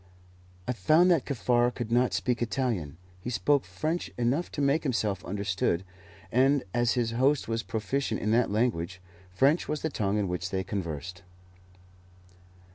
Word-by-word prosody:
I 125 - 0
found 155 - +4
that 165 -7 +2
Kaffar 120 -2 +2
could 120 -3 -4
not 125 +1 +3
speak 125 -1 -1
Italian. 115 - -1 0.2
He 105 - -5
spoke 125 +6 +2
French 160 +3 -3
enough 125 +8 0
to - - -4
make 140 +3 +2
himself 110 -8 -1
understood, 95 -3 -1 0.5
and, 135 +3 +3
as 120 -1 +2
his 120 -2 0
host 130 +4 +2
was 115 0 -1
proficient 110 +4 -2
in 105 - -1
that 120 +1 +3
language, 100 -5 0 0.3
French 135 - +2
was 150 -1 -3
the 160 - -1
tongue 105 -4 0
in 105 -2 0
which 90 +1 -3
they 95 0 -1
conversed. 90 -2 -5
120 Hz, 155 wpm, -28 LUFS, 100-135 Hz, 0.5 s, found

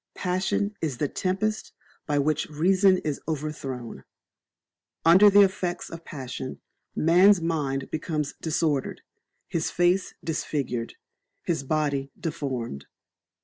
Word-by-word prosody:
Passion 185 +3 -1
is 150 -6 -2
the 145 - 0
tempest 195 +7 -2 0.3
by 145 -1 +1
which 150 +2 +1
reason 185 +5 +4
is 150 -2 -2
overthrown. 135 - -5 1.0
Under 185 +5 +8
the 205 0 +7
effects 185 -2 -2
of 165 0 -8
passion, 130 -3 -6 0.4
man's 180 +5 +5
mind 145 -5 -2
becomes 155 -2 -2
disordered, 155 -3 -1 0.5
his 165 -1 -1
face 175 +2 +1
disfigured, 140 -7 -3 0.5
his 165 -5 -1
body 140 -1 -1
deformed. 125 - -4
155 Hz, 105 wpm, -26 LUFS, 140-180 Hz, 1.0 s, Under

